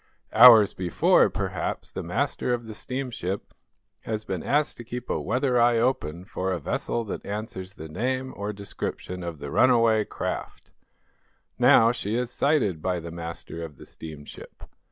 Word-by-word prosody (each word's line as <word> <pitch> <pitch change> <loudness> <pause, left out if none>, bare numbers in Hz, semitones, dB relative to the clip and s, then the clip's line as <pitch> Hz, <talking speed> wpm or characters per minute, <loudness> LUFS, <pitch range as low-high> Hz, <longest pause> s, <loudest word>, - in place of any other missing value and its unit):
Hours 110 -3 +9
before, 90 -2 +3
perhaps, - - -3
the - - -5
master 125 - -1
of 120 -1 -9
the 110 - -8
steamship 125 -6 -4 0.5
has 110 -1 -4
been 95 -4 -3
asked 145 - 0
to 120 - -8
keep 120 +1 -6
a - - -1
weather 125 -1 +1
eye 120 0 +4
open 105 -9 -1
for 95 -1 -3
a 90 - -1
vessel 115 +9 -2
that 105 - -6
answers 100 -2 -6
the 80 - -8
name 130 +9 -2
or 100 +1 -3
description 100 -2 -6
of 85 -2 -5
the 70 0 -7
runaway 115 -4 +4
craft. - - -5 0.9
Now, 115 +1 +6
she 110 -3 -3
is 125 0 -1
sighted 125 - +1
by 90 0 -1
the 85 0 -8
master 85 0 -7
of 75 -4 -9
the - - -12
steamship. 75 -2 -11
105 Hz, 160 wpm, -26 LUFS, 90-125 Hz, 0.9 s, Hours